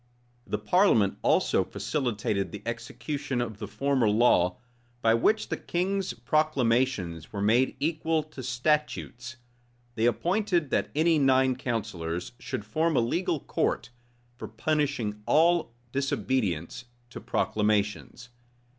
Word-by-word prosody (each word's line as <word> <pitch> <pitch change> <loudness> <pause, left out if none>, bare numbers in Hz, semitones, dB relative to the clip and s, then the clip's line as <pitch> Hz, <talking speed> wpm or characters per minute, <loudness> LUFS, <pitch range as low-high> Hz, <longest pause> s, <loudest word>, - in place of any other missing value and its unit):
[*] 120 0 -36
The - - -1
parliament 180 - +3
also - - +3
facilitated 110 -8 -2
the 105 0 -8
execution 135 +3 -4
of 110 -4 -3
the 105 - -5
former 130 +1 +1
law 105 -5 +3 0.5
by 115 0 +5
which 215 - +2
the - - -2
king's 190 +2 -1
proclamations 125 - 0
were 100 - -5
made 115 +6 +2
equal 160 +1 0
to 155 -3 -10
statutes: 125 -1 -1 0.6
they 115 -1 0
appointed 175 - 0
that - - +1
any 160 +1 +3
nine 130 -1 +3
counsellors 105 -9 -3
should 105 - -5
form 155 +7 +1
a - - +6
legal 165 +6 0
court - - -1 0.5
for - - -7
punishing 120 -3 -1
all 165 -3 +3 0.2
disobedience 125 - -1 0.3
to - - -8
proclamations. 105 +3 -1
125 Hz, 120 wpm, -27 LUFS, 110-155 Hz, 0.6 s, a